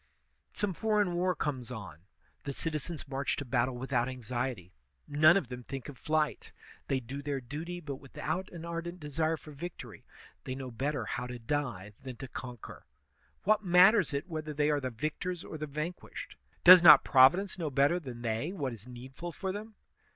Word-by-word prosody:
Some 205 -2 -1
foreign 210 -2 +1
war 180 +1 +1
comes 135 -6 -3
on; 100 -10 -8 0.4
the 140 - -4
citizens 155 +1 -3
march 135 +1 -1
to 145 - -5
battle 125 0 +1
without 125 -1 0
anxiety; 120 -6 -4 0.3
none 155 +5 +6
of 150 -11 -2
them 125 -1 -6
think 135 +2 -7
of 140 - -10
flight. 155 -1 -1 0.4
They 135 - +1
do 130 +3 -7
their 140 -1 -2
duty, 155 +8 -6
but 145 -5 -6
without 145 +7 -4
an 170 -1 -8
ardent 170 +1 -5
desire 155 +1 -1
for 155 - -12
victory; 165 +4 -8 0.4
they 130 - -4
know 130 -1 -6
better 130 +1 -2
how 125 - -3
to 125 0 -6
die 120 -6 -3
than 130 -2 -7
to 135 - -8
conquer. 125 - -9 0.6
What 215 +1 +3
matters 185 +2 +6
it 140 +3 -3
whether 155 -3 -5
they 150 +1 +2
are 145 - +2
the 130 -2 -3
victors 155 +8 -3
or 155 - -8
the 155 - -3
vanquished? 155 +5 -6 0.3
Does 180 0 +11
not 155 -3 +10
Providence 175 +9 +5
know 160 -3 -1
better 140 +6 +3
than 125 -7 -8
they 115 +8 -1
what 145 -10 -3
is 110 +1 -11
needful 130 +7 -8
for 190 +3 -3
them 215 +2 -7
145 Hz, 180 wpm, -31 LUFS, 130-170 Hz, 0.6 s, Does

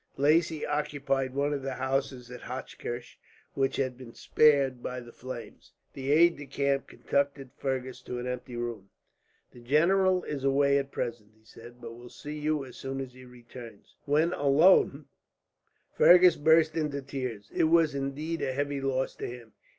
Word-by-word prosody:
Lacy 155 +2 +2
occupied 140 -3 -1
one 145 +1 0
of 140 - -3
the 135 -1 -4
houses 130 -1 -2
at 125 - -9
Hochkirch 125 -1 -7 0.3
which 135 -1 0
had 130 -2 -2
been 120 -3 -11
spared 140 -4 +3
by 125 +1 -4
the 120 -1 -12
flames. 125 -1 -10 0.2
The 135 +1 -3
aide 170 +3 +5
de 145 -1 -9
camp 140 0 -1
conducted 140 -2 -2
Fergus 130 -2 -4
to 125 - -5
an 120 - -5
empty 125 0 -5
room. 120 -5 -5 0.6
"The - - -15
general 180 +8 +3
is 140 -3 -5
away 140 +1 +3
at 135 0 -4
present," 115 -4 -4
he 110 - -30
said, 120 +2 -14
"but 115 -1 -8
will 120 +1 -12
see 150 +4 -8
you, 150 -2 -1
as 125 - -12
soon 135 0 -5
as 130 -2 -6
he 130 0 -14
returns." 120 -3 -13
When 155 +4 +2
alone, 145 0 +4 0.9
Fergus 180 0 +7
burst 160 +1 +4
into 150 -3 -2
tears. 125 -7 -6
It - - +2
was 160 -2 +4
indeed 140 +4 -3
a 130 - -1
heavy 145 0 -2
loss 135 -1 -1
to - - -4
him. 120 -2 -10
135 Hz, 170 wpm, -28 LUFS, 125-145 Hz, 0.9 s, Fergus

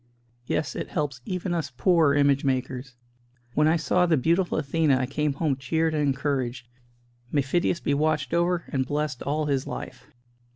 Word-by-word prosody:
Yes, 155 - -1
it - - -4
helps 140 -4 -2
even 180 -1 -2
us 165 -4 -2
poor 165 -5 +4
image 140 -1 +3
makers. 130 -1 -2 0.6
When 150 +2 +3
I 160 - +4
saw 175 +3 +2
the 160 -2 +3
beautiful 170 +7 +1
Athena 145 -1 +2
I 130 - 0
came 150 +2 -1
home 145 -1 0
cheered 160 +5 0
and 150 - 0
encouraged. 135 -3 -1 0.6
May 145 -2 +2
Phidias 170 +5 0
be 145 - 0
watched 150 -2 0
over 170 0 +1
and 135 -3 0
blessed 145 -1 -2
all 150 +2 -1
his 140 -3 -1
life!" - - -7
145 Hz, 170 wpm, -26 LUFS, 135-165 Hz, 0.6 s, poor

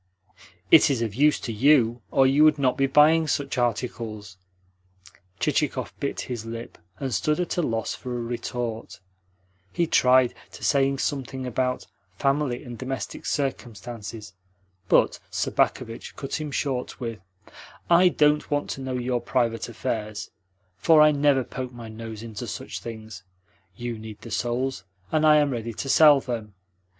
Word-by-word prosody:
"It 160 - +8
is 125 -4 0
of 110 -3 -3
use 145 +5 +3
to 115 - -4
YOU, 120 -1 +3
or 135 - +4
you 140 +3 +4
would 155 -1 +5
not 130 -3 +2
be 135 - +2
buying 155 +3 +5
such 140 -3 -1
articles." 115 -4 -3 1.0
Chichikov - - 0
bit - - -2
his 120 -3 -5
lip, 115 +1 -8 0.2
and 130 -2 -3
stood 150 - +1
at 180 - -1
a - - +3
loss 115 -7 -1
for 125 -1 -5
a - - -3
retort. 115 -4 -4 0.7
He 170 - +1
tried 130 -5 +4 0.2
to - - -11
saying 135 -1 +2
something 135 -2 -3
about 125 +1 -1 0.3
"family 135 0 0
and 120 -4 -9
domestic 130 0 -5
circumstances," 115 -5 -4 0.6
but - - +3
Sobakevitch 115 0 -1
cut 140 +3 -4
him 150 - -4
short 135 -2 -3
with: 115 -4 -5 0.7
"I 175 +1 +6
don't 150 -2 +2
want 145 0 -1
to 135 - -5
know 130 -1 -3
your 125 -1 -1
private 120 -2 -1
affairs, 110 -2 -4 0.5
for 160 -2 +5
I 150 0 +7
never 140 -2 +3
poke 125 0 -6
my 120 -2 -9
nose 110 0 -8
into 110 -3 -7
such - - -6
things. 110 -4 -8 0.5
You 120 0 -5
need 110 -1 -9
the 115 - -10
souls, 120 -2 -2 0.3
and 155 0 +3
I 155 - +7
am 145 -2 +3
ready 115 -2 -4
to 135 - -5
sell 150 -1 +7
them. 115 -6 -5
125 Hz, 155 wpm, -25 LUFS, 115-140 Hz, 1.0 s, It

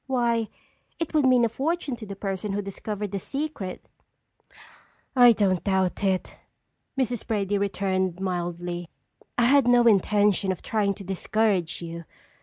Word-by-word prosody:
Why, 235 -3 +1 0.5
it 330 -1 -3
would 295 -4 +4
mean 250 -2 +5
a - - 0
fortune 285 +3 -2
to 220 - -9
the 200 - -6
person 195 0 -3
who 205 - -1
discovered 205 +1 -5
the 200 - -2
secret." 270 - -5 1.3
"I 245 -2 +8
don't 190 -6 +1
doubt 190 -1 0
it," 190 -2 -1 0.6
Mrs. 245 -3 -1
Brady 205 -2 0
returned 190 -2 -1
mildly. 175 -2 -3 0.5
"I 240 - +3
had 270 +1 +5
no 245 0 +6
intention 205 -2 +3
of 185 - -5
trying 205 -3 0
to 200 - -9
discourage 190 -2 0
you. 170 0 -7
200 Hz, 145 wpm, -25 LUFS, 185-235 Hz, 1.3 s, I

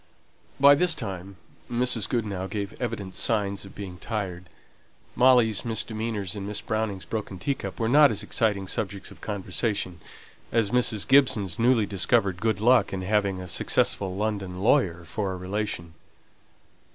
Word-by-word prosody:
By 140 +1 +8
this 170 +3 +3
time 100 - -6 0.4
Mrs. 120 -3 +2
Goodenough 100 -6 -2
gave 100 0 -4
evident 105 -6 -4
signs 100 -3 0
of 95 - -13
being 95 -3 -8
tired; 90 -6 -5 0.7
Molly's 120 -5 +4
misdemeanors 110 -4 -2
and 100 -1 -5
Miss 105 0 -2
Browning's 110 -4 -3
broken 105 -4 -5
teacup 140 +8 -4
were 115 - 0
not 145 +4 +6
as - - -4
exciting 105 -4 0
subjects 100 -1 -4
of - - -15
conversation 100 -3 -2 0.5
as 110 -3 +1
Mrs. 115 -4 +2
Gibson's 115 -10 +3
newly 115 -2 +4
discovered 95 -1 +1
good 110 -3 0
luck 120 +4 +4
in 95 -1 -4
having 100 -1 0
a 90 - -7
successful 95 +2 +1
London 100 -3 -3
lawyer 95 - +2
for 100 +1 -3
a - - -5
relation. 90 -2 -4
105 Hz, 145 wpm, -26 LUFS, 95-115 Hz, 0.7 s, By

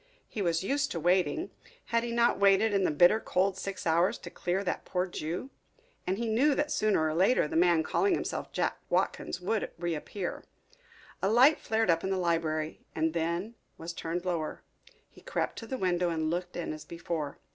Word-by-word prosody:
He 215 - -5
was 170 -2 +1
used 280 +6 0
to 170 - -3
waiting 185 - +1 0.4
had 230 - +4
he 240 - -3
not 235 0 +2
waited 200 +2 +4
in 195 -2 +2
the - - +3
bitter 175 +8 +5
cold 190 -2 +1
six 195 0 -5
hours 170 +3 +3
to - - -10
clear 185 +3 -1
that 185 - -2
poor 180 -1 -1
Jew? 175 - -5 0.6
and 185 +1 0
he 235 +1 -2
knew 265 +7 +3
that 295 0 -1
sooner 210 -7 +2
or 155 - -1
later 185 +2 +3
the - - -6
man 170 -1 +4
calling 390 - +2
himself - - -4
Jack - - -1
Watkins - - 0
would 210 +4 -1
reappear. 175 +2 -4 0.8
A 195 - +2
light 255 +8 +6
flared 220 -4 +1
up 165 0 0
in 190 - -1
the 190 - 0
library 165 -3 -1
and 160 0 +1
then 170 +6 -2 0.2
was 165 +1 -6
turned 170 +2 -4
lower. 170 -4 -2 0.4
He - - -18
crept - - -2
to 225 - -9
the 260 - -3
window 180 -4 +1
and 160 -1 -1
looked 180 +1 -3
in 175 - -3
as 155 - -8
before. 165 -3 -4
180 Hz, 195 wpm, -30 LUFS, 165-220 Hz, 0.8 s, light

